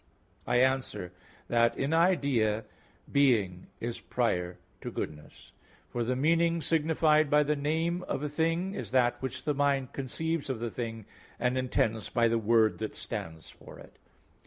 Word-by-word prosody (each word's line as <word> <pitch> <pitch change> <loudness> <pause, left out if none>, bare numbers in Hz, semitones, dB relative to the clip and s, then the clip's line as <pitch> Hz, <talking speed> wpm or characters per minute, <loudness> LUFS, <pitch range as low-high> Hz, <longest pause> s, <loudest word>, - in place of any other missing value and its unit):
I - - +1
answer 130 -8 0 0.4
that, 115 0 +2
In 140 +4 0
idea 140 - +2 0.5
being 110 -11 +2
is 120 0 -4
prior 90 -8 -1 0.2
to - - -4
goodness. 75 0 -7 0.4
For 120 - -1
the 125 +2 0
meaning 165 +4 +2
signified 155 -1 +3
by 150 +1 +5
the 150 +1 0
name 160 +5 -1
of 140 - -2
a - - 0
thing 165 +5 0
is 120 - -5
that 120 0 +2
which 130 0 -4
the 150 - 0
mind 140 -2 0
conceives 160 +3 -3
of 130 -4 -2
the 120 0 -3
thing 115 -3 -5 0.3
and 125 +1 0
intends 115 -4 0
by 120 -1 +3
the 115 0 +1
word 110 0 +3
that 110 -1 -4
stands 80 -1 -6
for - - -14
it. - - -15
130 Hz, 160 wpm, -29 LUFS, 115-150 Hz, 0.5 s, by